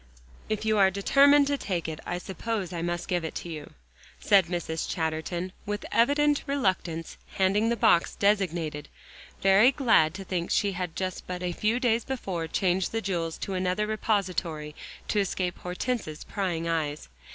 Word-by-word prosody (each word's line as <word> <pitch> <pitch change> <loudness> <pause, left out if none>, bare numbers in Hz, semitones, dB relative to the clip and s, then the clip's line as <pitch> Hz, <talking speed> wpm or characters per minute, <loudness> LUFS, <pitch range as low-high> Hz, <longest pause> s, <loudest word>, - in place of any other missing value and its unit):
"If 215 0 -2
you 215 -1 +2
are 190 -1 +6
determined 280 +9 +5
to 285 0 -1
take 175 -5 -2
it, 160 -1 -5
I 175 - -2
suppose 190 +1 -4
I 170 - -3
must 175 0 -2
give 175 -2 0
it 160 - -5
to 175 - -5
you," 155 -3 -8 0.5
said 195 -4 +4
Mrs. 165 -2 -3
Chatterton, 165 +2 -2 0.2
with 205 0 -3
evident 290 +4 +3
reluctance 185 - -1 0.2
handing 200 +4 +2
the 235 - +2
box 170 -5 +3
designated, 170 -7 0 0.5
very 195 +6 +6
glad 225 - +3
to 195 - -6
think 180 -2 -3
she 205 -1 +2
had 180 -3 -4 0.3
but 180 0 -4
a 180 - -1
few 215 +7 0
days 235 -2 +2
before 190 -11 -3
changed 185 +1 0
the 225 - -1
jewels 170 -5 -2
to 195 - -4
another 185 +3 0
repository 185 -8 -1 0.4
to 210 - +2
escape 185 -2 -1
Hortense's 180 -3 -3
prying 175 -4 -2
eyes. 155 -3 -2
185 Hz, 165 wpm, -27 LUFS, 170-215 Hz, 0.5 s, are